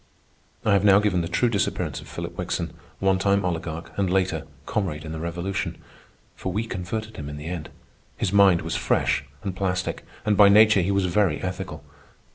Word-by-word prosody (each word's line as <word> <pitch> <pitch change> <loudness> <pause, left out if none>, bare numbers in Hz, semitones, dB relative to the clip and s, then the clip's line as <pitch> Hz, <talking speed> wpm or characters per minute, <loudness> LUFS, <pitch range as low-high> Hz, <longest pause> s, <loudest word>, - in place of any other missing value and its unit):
I 105 - +4
have 100 -1 +3
now 100 -2 +7
given 100 -4 +2
the 85 - -2
true 90 +8 +2
disappearance 105 -4 -1
of - - -13
Philip - - -6
Wickson, - - -3 0.2
one 95 -1 +2
time 100 0 +2
oligarch, 80 -1 -3
and, 95 -2 +2
later, 90 -4 0 0.2
comrade 80 -7 -2
in 80 - -6
the 80 - -5
Revolution. 85 +4 -3 0.6
For 95 - -4
we 110 +5 -1
converted 110 +3 -5
him 75 -1 -6
in 75 - -6
the 75 - -8
end. 85 -2 -5 0.5
His 90 - -1
mind 100 -5 +5
was 85 0 -3
fresh 70 +2 +1 0.2
and 95 -2 -3
plastic, 90 -1 -2 0.2
and 105 -1 +3
by 100 0 +8
nature 105 -1 +6
he 90 - -1
was 100 -1 +2
very 90 -3 +2
ethical. 90 -5 -5
95 Hz, 190 wpm, -25 LUFS, 85-100 Hz, 0.6 s, by